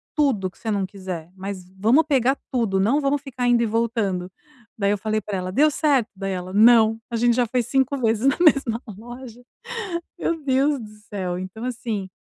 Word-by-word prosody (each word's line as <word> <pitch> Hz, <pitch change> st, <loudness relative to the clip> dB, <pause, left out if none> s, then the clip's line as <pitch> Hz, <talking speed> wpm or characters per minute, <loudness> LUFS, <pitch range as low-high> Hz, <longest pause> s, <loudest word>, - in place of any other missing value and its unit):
tudo 250 Hz, -11 st, +1 dB
que -, -, -26 dB
você 225 Hz, -, -5 dB
não 200 Hz, -2 st, 0 dB
quiser. 185 Hz, -4 st, -7 dB
Mas 190 Hz, -1 st, -6 dB
vamos 235 Hz, +11 st, +4 dB
pegar 270 Hz, -2 st, +2 dB
tudo, 225 Hz, -7 st, +1 dB
não 250 Hz, +9 st, +3 dB
vamos 280 Hz, 0 st, 0 dB
ficar 255 Hz, -3 st, -3 dB
indo 240 Hz, -1 st, +4 dB
e -, -, +2 dB
voltando". 215 Hz, -5 st, -1 dB, 0.5 s
Daí 200 Hz, -1 st, +1 dB
eu 205 Hz, -, +1 dB
falei 215 Hz, +1 st, -1 dB
pra 195 Hz, -1 st, -4 dB
ela: 185 Hz, 0 st, -4 dB
"Deu 300 Hz, +9 st, +4 dB
certo?" 280 Hz, -7 st, +2 dB
Daí 195 Hz, 0 st, -4 dB
ela: 185 Hz, 0 st, -4 dB
"Não, 225 Hz, 0 st, +6 dB
a 235 Hz, -, -3 dB
gente 235 Hz, 0 st, +3 dB
já 245 Hz, -1 st, +2 dB
foi 250 Hz, +2 st, +1 dB
5 265 Hz, +3 st, +1 dB
vezes 225 Hz, 0 st, +1 dB
na 275 Hz, -, +3 dB
mesma 270 Hz, -7 st, +3 dB, 0.2 s
loja". 240 Hz, +1 st, -10 dB, 0.8 s
Meu 335 Hz, -1 st, -1 dB
Deus 275 Hz, +1 st, +2 dB
do 215 Hz, -, -9 dB, 0.2 s
céu! 185 Hz, -4 st, -3 dB
Então 185 Hz, +5 st, -7 dB
assim 225 Hz, -6 st, -4 dB
230 Hz, 195 wpm, -23 LUFS, 195-260 Hz, 0.8 s, Não